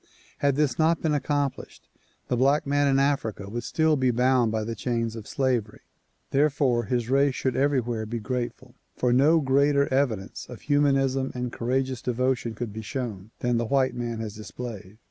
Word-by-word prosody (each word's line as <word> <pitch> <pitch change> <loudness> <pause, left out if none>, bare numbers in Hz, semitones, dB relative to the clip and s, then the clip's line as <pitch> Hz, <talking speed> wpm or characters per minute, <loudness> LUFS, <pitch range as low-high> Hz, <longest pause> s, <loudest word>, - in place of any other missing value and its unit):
Had 140 -1 +2
this 140 -4 0
not 160 +1 +3
been 155 -2 0
accomplished 145 -1 -2 0.4
the 125 - 0
black 135 +4 +3
man 145 0 +2
in 135 -1 +3
Africa 135 -8 0
would 120 +4 -4
still 160 +4 +2
be 130 -3 +2
bound 125 -1 +3
by 110 0 -1
the 115 +2 -3
chains 115 0 -2
of 110 -2 -8
slavery. 125 -6 -1 0.5
Therefore 135 -4 +2
his 120 +1 -1
race 135 +1 +3
should 130 -2 -1
everywhere 120 -5 0
be 120 +2 -3
grateful, 125 +2 -4 0.2
for 125 -1 +2
no 150 +6 +5
greater 140 +1 +3
evidence 115 -8 -1
of 125 - -9
humanism 135 -2 +2
and 125 -1 -3
courageous 130 +1 -1
devotion 125 -1 -1
could 110 -2 -5
be 110 - -5
shown 110 -4 -5
than 120 -1 +1
the 120 - 0
white 130 +2 +2
man 120 -2 -4
has 110 -2 -5
displayed. 105 -1 -8
125 Hz, 175 wpm, -26 LUFS, 115-140 Hz, 0.5 s, no